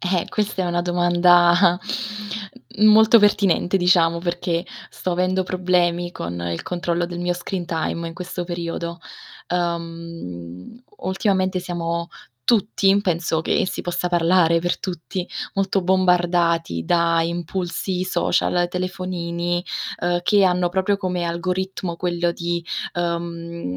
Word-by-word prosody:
Eh, 180 -1 0
questa 210 -3 -1
è 180 - -1
una 175 0 0
domanda 175 0 +4 1.0
molto 220 +2 +7
pertinente 200 -3 +3
diciamo, 175 -2 +3
perché 175 0 -2 0.3
sto 185 - -4
avendo 185 +1 +1
problemi 175 -1 0
con 85 - -5
il 85 - -4
controllo 175 -1 -1
del 175 0 -6
mio 175 0 0
screen 175 0 -4
time 165 0 -2
in 165 - -10
questo 180 0 -5
periodo. 170 0 -4 0.5
Uhm, 165 - -5 0.2
ultimamente 190 -1 0
siamo 170 -1 -3 0.4
tutti, 200 -3 +3
penso 165 -3 0
che - - +1
si - - -4
possa 175 0 -2
parlare 170 -1 +3
per 175 +1 -1
tutti, 180 0 -5 0.3
molto 195 0 +1
bombardati 175 - +2
da 170 - +2
impulsi 175 +2 -2
social, 180 -1 +1
telefonini, 175 -1 -2 0.4
uhm, 175 0 +1
che 200 +2 +4
hanno 180 -1 +2
proprio 190 +3 +1
come 180 -3 -2
algoritmo 180 +1 -2
quello 175 -1 0
di, 170 0 -3 0.3
uhm, 170 - -3
175 Hz, 120 wpm, -22 LUFS, 170-185 Hz, 1.0 s, molto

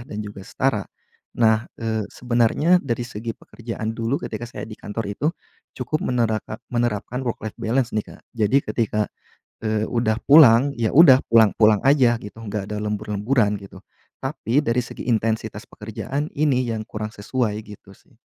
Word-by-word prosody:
dan 105 - -5
juga 105 -1 -9
setara. 110 -3 -1 0.5
Nah, 110 -1 +3
eee, 110 -1 -1
sebenarnya 125 +9 +2
dari 120 -4 -2
segi 115 0 -6
pekerjaan 115 -1 -6
dulu 115 +3 -1
ketika 110 +1 -5
saya - - -7
di - - -9
kantor 110 +2 -5
itu 135 - -2 0.5
cukup 155 - -2
menerakan 110 -3 -1 0.2
menerapkan 120 +1 -1
work 120 - -2
life 110 - -6
balance 120 +2 0
nih, 105 -1 -1
Kak. - - -22
Jadi 110 +2 +1 0.2
ketika, 105 -2 0 0.6
eee, 110 0 0
udah 115 -3 0
pulang, 140 -3 +7
ya 115 -2 0
udah 140 -4 +8
pulang-pulang 110 -1 +5
aja 130 -4 +5
gitu 105 - -10
enggak 100 -2 -4
ada - - -2
lembur-lemburan 105 +1 0
gitu. 100 - -12 0.4
Tapi 135 -2 -1
dari 115 +2 +2
segi - - -9
intensitas 110 -2 -1
pekerjaan 115 +7 -4
ini 140 -4 +2
yang 110 - -3
kurang 110 +1 -6
sesuai 105 0 -1
gitu 100 -2 -13
sih. - - -27
115 Hz, 155 wpm, -22 LUFS, 105-125 Hz, 0.6 s, udah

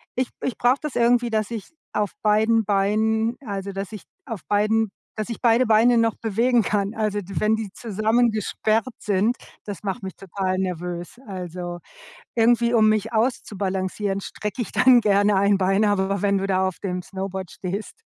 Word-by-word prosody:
ich 255 0 0
ich 245 - -2
brauche 245 +2 +3
das 300 -3 -5
irgendwie, 240 0 +3
dass 215 -1 -1
ich 225 -4 -5 0.2
auf 210 -1 0
beiden 220 +1 +3
Beinen 220 +3 +1
also, 200 -2 -4
dass 195 +1 -5
ich 215 - -8 0.2
auf 225 -7 -6
beiden 215 +1 +2 0.2
dass 215 +1 -4
ich 230 - -5
beide 235 +1 +4
Beine 225 +2 +5
noch 230 -1 +2
bewegen 230 +3 +2
kann. 200 +1 0
Also, 215 -2 0
d 195 +1 -10
wenn 215 +1 +3
die 220 -3 -5
zusammengesperrt 220 0 +1
sind, 210 +4 +1 0.3
das 205 -1 -7
macht 195 -2 -3
mich 190 -1 -6
total 190 0 -3
nervös. 180 +2 -4
Also, 180 -2 -6 0.6
irgendwie, 235 +1 +3
um 220 -2 +5
mich 215 +1 0
auszubalancieren, 200 -4 -1
strecke 210 +3 -5
ich - - -7
dann 250 -1 +6
gerne 205 -1 +3
ein 200 +1 +4
Bein, 195 +2 +2
aber 200 -1 +1
wenn 200 -1 +2
du 195 - -2
da 190 -1 +2
auf 185 - -8
dem 180 -2 -3
Snowboard 190 -1 -5
stehst, 195 +3 -5
210 Hz, 175 wpm, -23 LUFS, 195-225 Hz, 0.6 s, dann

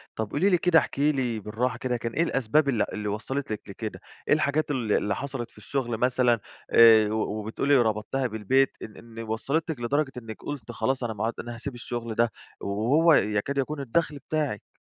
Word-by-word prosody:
طَب 110 -2 -3
قولي 185 +7 +2
لي 180 - +4
كده، 165 -1 +5
احكي 145 0 +1
لي 125 -6 -1
بالراحة 115 +4 -2
كده، 125 0 -1
كان 115 0 -4
إيه 165 - +2
الأسباب 140 0 +2
اللي 115 -6 +2
اللي 105 -1 -4
وصّلت 110 +6 -3
لِك 105 - -3
لكده؟ - - -6 0.3
إيه - - +5
الحاجات 155 0 +1
ال 120 -6 -1
اللي 105 0 +1
حصلت 135 -4 -5
في - - -27
الشغل 120 +2 -2
مثلًا 125 -1 +2 0.3
آآ، 110 -2 +7
و 110 - -1 0.2
وبتقولي 115 +7 +1
ربطتِيها 115 +3 0
بالبيت 125 +5 +2
إن 110 - -9
إن 115 -1 -12
وصلتِك 140 +7 -2
لدرجة 140 +4 0
إنِّك 115 -3 -8
قلتِ 135 -6 -6
خلاص 130 +3 -1
أنا 115 -2 -2
ما 105 +1 -2
عد 115 - -1
أنا 120 0 -6
هاسيب 120 +3 -6
الشغل 120 -1 -5
ده، 120 0 +2 0.3
وهو 130 +12 +3
يكاد 105 +4 +1
يكون 145 +2 -1
الدخل 145 +3 -1
بتاعِك؟ 150 -9 -2
120 Hz, 195 wpm, -26 LUFS, 110-140 Hz, 0.3 s, آآ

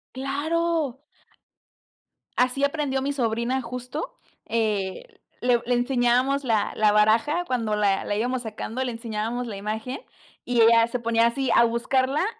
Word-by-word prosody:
¡Claro! 290 +1 -1 1.4
Así 255 +3 +1
aprendió 280 -2 -1
mi 280 +1 -1
sobrina 235 +1 -1
justo, 250 - -6 0.3
eh, 220 - -2 0.2
le 245 -1 +3
le 245 - +1
enseñábamos 250 +2 +2
la 220 -5 0
la 215 -1 +4
baraja 225 +11 +3
cuando 230 -7 -1
la 200 -2 +1
la 205 - -2
íbamos 245 +4 -1
sacando, 225 +3 -4
le 250 - -2
enseñábamos 230 +1 -4
la 210 - -5
imagen, 220 - -4 0.4
y 245 -1 +1
ella 230 0 +6
se 240 +1 -3
ponía 230 0 +2
así 265 +1 -1
a 235 - +7
buscarla 260 +6 +1
245 Hz, 140 wpm, -25 LUFS, 225-270 Hz, 1.4 s, a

